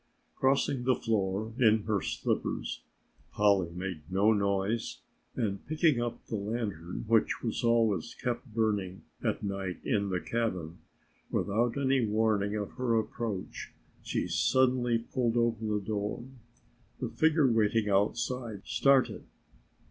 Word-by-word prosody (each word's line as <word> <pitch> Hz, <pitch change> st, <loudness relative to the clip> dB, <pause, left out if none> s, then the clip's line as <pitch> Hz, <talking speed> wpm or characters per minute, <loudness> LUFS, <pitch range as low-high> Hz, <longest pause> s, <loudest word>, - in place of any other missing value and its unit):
Crossing 135 Hz, -1 st, +1 dB
the 130 Hz, 0 st, +3 dB
floor 105 Hz, 0 st, -1 dB
in 110 Hz, -3 st, +4 dB
her 105 Hz, -3 st, 0 dB
slippers -, -, -2 dB, 0.5 s
Polly 100 Hz, -4 st, +3 dB
made 90 Hz, -1 st, -5 dB
no 100 Hz, +4 st, +4 dB
noise 100 Hz, +2 st, -1 dB, 0.3 s
and 100 Hz, -5 st, -2 dB
picking 155 Hz, -4 st, +2 dB
up 120 Hz, -1 st, -4 dB
the 110 Hz, -, -3 dB
lantern 100 Hz, -5 st, -4 dB
which 115 Hz, -1 st, +2 dB
was 115 Hz, -1 st, -2 dB
always 115 Hz, -7 st, +2 dB
kept 125 Hz, 0 st, -4 dB
burning 105 Hz, -4 st, -1 dB, 0.2 s
at -, -, -1 dB
night 95 Hz, -2 st, -3 dB
in 100 Hz, -1 st, +1 dB
the 90 Hz, -1 st, 0 dB
cabin, 90 Hz, -9 st, -2 dB, 0.5 s
without 115 Hz, +5 st, 0 dB
any 135 Hz, -2 st, +2 dB
warning 105 Hz, -1 st, +1 dB
of 105 Hz, -2 st, -3 dB
her 120 Hz, -3 st, +2 dB
approach 110 Hz, -3 st, -4 dB, 0.3 s
she -, -, -2 dB
suddenly 125 Hz, -2 st, +2 dB
pulled 120 Hz, 0 st, -1 dB
open 115 Hz, -2 st, +1 dB
the 105 Hz, -, +1 dB
door. 105 Hz, +2 st, -3 dB, 0.8 s
The -, -, -2 dB
figure 160 Hz, -1 st, +3 dB
waiting 110 Hz, -1 st, +2 dB
outside 110 Hz, +2 st, 0 dB
started. 135 Hz, -2 st, +3 dB
110 Hz, 125 wpm, -30 LUFS, 100-120 Hz, 0.8 s, in